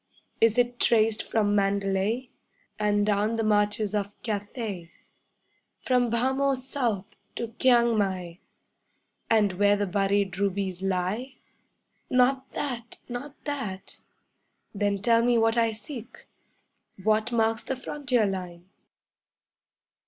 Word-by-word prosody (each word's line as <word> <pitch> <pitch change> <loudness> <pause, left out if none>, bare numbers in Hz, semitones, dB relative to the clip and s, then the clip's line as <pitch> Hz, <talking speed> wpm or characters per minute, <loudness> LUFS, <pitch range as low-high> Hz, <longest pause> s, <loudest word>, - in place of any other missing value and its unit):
Is 225 +1 +4
it 245 0 +1
traced 220 -1 +3
from 210 -2 0
Mandalay, 200 +4 0 0.5
And 205 -1 +2
down 210 +2 +1
the 225 - 0
marches 210 -1 +1
of 205 -1 -3
Cathay, 205 -4 -4 0.9
From 250 -2 +2
Bhamo 265 +4 +1
south 250 -6 -2 0.3
to 235 - -3
Kiang 235 -2 +4
mai, 185 -3 -2 0.9
And 210 -4 +3
where 205 0 +5
the 205 0 0
buried 195 0 0
rubies 195 -2 -1
lie? 195 +8 -2 0.7
'Not 260 +1 +2
that! 240 -5 -4
Not 255 +4 -6
that!' 235 -11 -5 0.8
Then 200 -1 -1
tell 230 0 +4
me 240 0 +3
what 225 0 +3
I 230 -1 +3
seek: 225 +2 -9 0.8
What 215 +2 +2
marks 225 -1 +1
the 265 - -3
frontier 255 -3 0
line? 180 -3 -5
215 Hz, 115 wpm, -27 LUFS, 200-240 Hz, 0.9 s, where